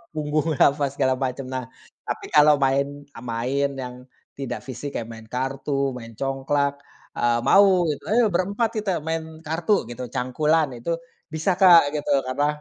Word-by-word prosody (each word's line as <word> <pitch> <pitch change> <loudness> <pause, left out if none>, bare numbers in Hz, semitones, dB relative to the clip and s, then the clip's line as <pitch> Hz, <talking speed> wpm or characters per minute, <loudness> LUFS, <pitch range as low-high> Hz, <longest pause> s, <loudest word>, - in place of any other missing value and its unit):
punggung, 155 +1 0 0.2
apa, 145 +1 -1
segala 130 -2 +1
macem. 130 +1 -3
Nah, 130 -1 -2 0.4
tapi - - -4
kalau 150 0 +7
main 135 +1 +2 0.3
main 125 +4 -1 0.2
yang 125 0 -7 0.4
tidak 135 - -4
fisik, 130 +3 -6
kayak 115 - -3
main 115 -1 -11
kartu, 135 +1 -1
main 115 -2 -10
congklak, 140 +1 -1 0.4
eee, 120 0 +2
mau, 190 +3 +5 0.2
"Ayo 220 -1 +3
berempat 200 +6 0
kita 205 -2 -1 0.2
main 160 0 -1 0.2
kartu," 165 +5 +1
gitu, 125 +1 -6
cangkulan, 150 +5 +1
itu 165 +8 -1 0.4
bisa, 160 +5 0
Kak, 170 -6 +7
gitu 150 - -2 0.2
karena 145 +3 0
140 Hz, 150 wpm, -23 LUFS, 130-160 Hz, 0.4 s, kalau